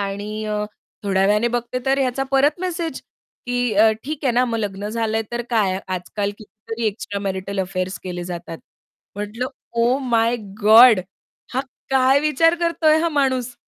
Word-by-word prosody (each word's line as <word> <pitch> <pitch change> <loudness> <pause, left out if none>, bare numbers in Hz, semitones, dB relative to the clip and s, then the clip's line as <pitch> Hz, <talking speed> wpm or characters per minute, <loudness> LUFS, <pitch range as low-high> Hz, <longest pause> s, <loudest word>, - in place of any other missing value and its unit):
आणि 205 +2 -4
अ, 210 0 -2 0.4
थोड्या 195 -1 +2
वेळाने 210 +4 +3
बघते 240 +1 -2
तर 270 +1 +3
ह्याचा 265 0 0
परत 285 +4 +3
मेसेज, 345 -3 -3 0.5
की 245 -2 0
अ, 220 +2 +6
ठीक 300 +1 -5
आहे 255 - +3
ना, 245 +2 +3
मग 230 -2 -2
लग्न 205 -1 -3
झालंय 225 0 -1
तर 240 0 -2
काय 200 -5 +1
आजकाल 185 +3 -3
कितीतरी 220 +2 -6
एक्स्ट्रा 200 -1 -3
मॅरिटल 195 0 -3
अफेअर्स 185 0 -3
केले 180 -1 -5
जातात. 175 -2 -6 0.6
म्हटलं 210 +4 -3 0.3
ओह 245 +3 +3
माय 230 0 +2 0.2
गोड 220 0 +8 0.5
हा 260 - +2 0.3
काय 265 +1 +4
विचार 305 +2 +3
करतोय 330 -2 +3
हा 335 - +1
माणूस? 260 -5 0
225 Hz, 160 wpm, -21 LUFS, 200-260 Hz, 0.6 s, गोड